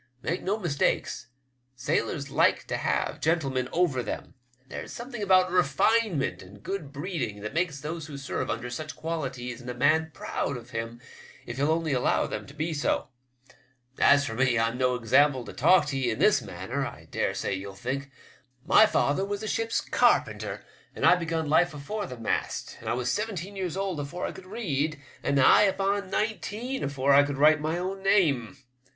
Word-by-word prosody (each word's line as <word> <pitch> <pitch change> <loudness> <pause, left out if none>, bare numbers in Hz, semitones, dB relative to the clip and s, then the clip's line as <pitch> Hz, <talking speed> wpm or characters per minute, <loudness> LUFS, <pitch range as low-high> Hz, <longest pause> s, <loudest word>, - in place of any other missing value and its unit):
Make 170 +3 -1
no 200 +3 0
mistake, 170 -9 0 0.7
sailors 130 +2 -1
like - - +3
to - - -2
have - - -1
gentlemen 135 -6 0
over 165 -8 +1
them. - - -6 0.3
There's - - -7
a - - -8
something 240 -1 -7
about 185 -2 +4
refine 185 +6 +3
ment 90 -10 -2
and 100 +3 -14
good 185 -8 -4
breeding 145 - -4
that 105 +3 -5
makes 165 -3 -1
those 155 +2 -5
who 145 -2 -7
serve 135 0 -3
under 125 +1 -3
such 155 +5 -5
qualities 130 -7 -4
in 125 - -8
a 125 - -4
man 155 +5 +3
proud 140 -2 -3
of 120 +1 -12
him 115 0 -5 0.5
if 120 - -6
he'll 145 +2 +1
only 160 -2 +1
allow 125 - +2
them - - -5
to 140 - -12
be 160 +2 -2
so. 145 -3 0 0.9
As 140 0 +5
for 115 - -4
me, 125 0 +2
I'm 115 +1 +1
no 125 0 +1
example 130 +2 +3
to - - -9
talk 170 +3 +5
to 135 - -2
ye 125 -2 +1
in 110 - -2
this - - +4
manner, - - -4
I - - -7
dare - - -1
say - - -2
yell 95 0 -6
think. 135 +6 -4 0.6
My 215 +5 +7
father 145 -2 +1
was 200 +1 -3
a - - -3
ship's 225 +1 0
carpenter, - - +1 0.3
and - - -1
I - - +8
begun 165 -2 -2
life 160 +2 +3
afore 205 +8 -4
the 125 - -8
mast, 115 - -2
and - - -5
I - - +1
was 125 0 -1
seventeen 205 -3 -3
years 185 -3 -3
old 195 -5 -2
afore 145 +5 -4
I - - -3
could 190 -1 -12
read, 155 -8 -2 0.2
and 140 - 0
nigh 135 -2 +6
upon 195 0 +1
nineteen 220 +5 -2
afore 140 0 +2
I 140 - +8
could 145 -1 -2
write 150 +1 +5
my 155 +2 -1
own 190 +2 -3
name." 150 - +2
150 Hz, 195 wpm, -27 LUFS, 130-185 Hz, 0.9 s, I